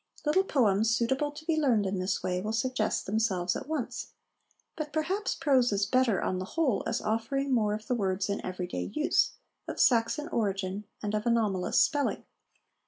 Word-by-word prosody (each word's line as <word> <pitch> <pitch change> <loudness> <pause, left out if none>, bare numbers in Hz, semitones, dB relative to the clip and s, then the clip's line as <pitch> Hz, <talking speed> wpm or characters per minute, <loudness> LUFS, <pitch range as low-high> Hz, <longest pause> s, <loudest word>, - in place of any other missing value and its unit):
Little 305 +6 +3
poems 220 - +2
suitable 265 +5 +1
to 300 +2 -11
be 325 -1 +1
learned 250 -9 +2
in 190 0 -1
this 185 +1 -1
way 180 0 -1
will 215 +3 -3
suggest 225 -1 0
themselves 190 -4 0
at - - -5
once; 310 -5 -4 0.6
but 305 -2 -5
perhaps 355 +7 -1
prose 260 -5 +3
is 200 0 +1
better, 255 -4 +2
on 185 - -1
the 185 - -3
whole, 280 -10 +2
as 225 - -1
offering 245 +6 -1
more 210 -3 +2
of 215 0 -8
the 250 - -1
words 195 -4 0
in 200 0 -2
everyday 180 -1 -4
use, 305 - +2 0.3
of - - -5
Saxon 240 +5 +3
origin, 200 - -2 0.2
and 210 0 -2
of 215 +2 -1
anomalous 215 -6 +2
spelling. 290 -1 +1
225 Hz, 175 wpm, -29 LUFS, 200-275 Hz, 0.6 s, Little